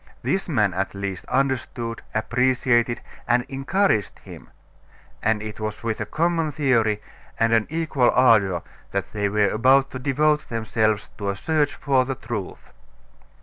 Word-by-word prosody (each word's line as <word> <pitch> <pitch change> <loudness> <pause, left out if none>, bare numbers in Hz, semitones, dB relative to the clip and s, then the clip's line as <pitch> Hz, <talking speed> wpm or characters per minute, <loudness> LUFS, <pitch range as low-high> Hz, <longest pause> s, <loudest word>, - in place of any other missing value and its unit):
This 195 -1 -1
man, 105 - +2
at 95 +2 -2
least, 100 -2 -5
understood, 125 -3 -1
appreciated, 120 +1 +1 0.3
and 120 0 +3
encouraged 135 - 0
him; - - -13 0.7
and 110 -1 +1
it 110 0 -7
was 110 +1 -5
with 110 -2 -2
a 105 - -3
common 165 +1 0
theory 115 -7 +1 0.4
and 115 0 +3
an 110 -2 +3
equal 155 -5 +1
ardor 105 -8 +4 0.3
that 100 -2 -2
they 105 -1 0
were 105 0 +2
about 130 +5 +3
to 130 - -6
devote 150 +3 +1
themselves 110 -2 0
to 100 -1 -2
a 100 - -1
search 150 +6 0
for 135 -2 +2
the 135 +1 -3
truth. 105 -6 -6
120 Hz, 150 wpm, -23 LUFS, 105-135 Hz, 0.7 s, ardor